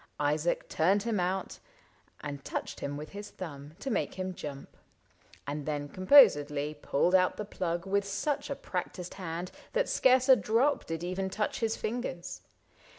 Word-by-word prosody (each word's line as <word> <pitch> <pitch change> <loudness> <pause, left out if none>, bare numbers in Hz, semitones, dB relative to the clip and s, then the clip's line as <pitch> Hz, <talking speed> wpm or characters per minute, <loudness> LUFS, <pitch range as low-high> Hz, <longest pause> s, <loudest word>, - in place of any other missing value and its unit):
Isaac 150 +3 +1
turned 195 +5 +2
him 225 -4 0
out, 185 +2 -2 0.6
And 140 -2 -6
touched - - -4
him 145 0 -3
with 150 +1 -7
his 205 +1 -8
thumb 150 -4 -8
to 270 - -3
make 215 - -1
him 185 0 -3
jump. 140 -5 -8 0.7
And 145 0 -4
then 145 -1 -2
composedly 150 - +5
pulled 150 +3 +1
out 185 -1 +4
the 210 - -3
plug 170 -3 -3
With 200 +1 +1
such 275 +11 -2
a 280 - -2
practiced 180 -4 -5
hand 180 -1 -5 0.2
that - - +2
scarce 255 0 +4
a 260 - +9
drop 235 +7 +2
Did 165 0 -4
even 185 +2 -2
touch 210 +2 -2
his 225 -1 0
fingers. 215 -6 -4
185 Hz, 160 wpm, -30 LUFS, 150-210 Hz, 0.7 s, a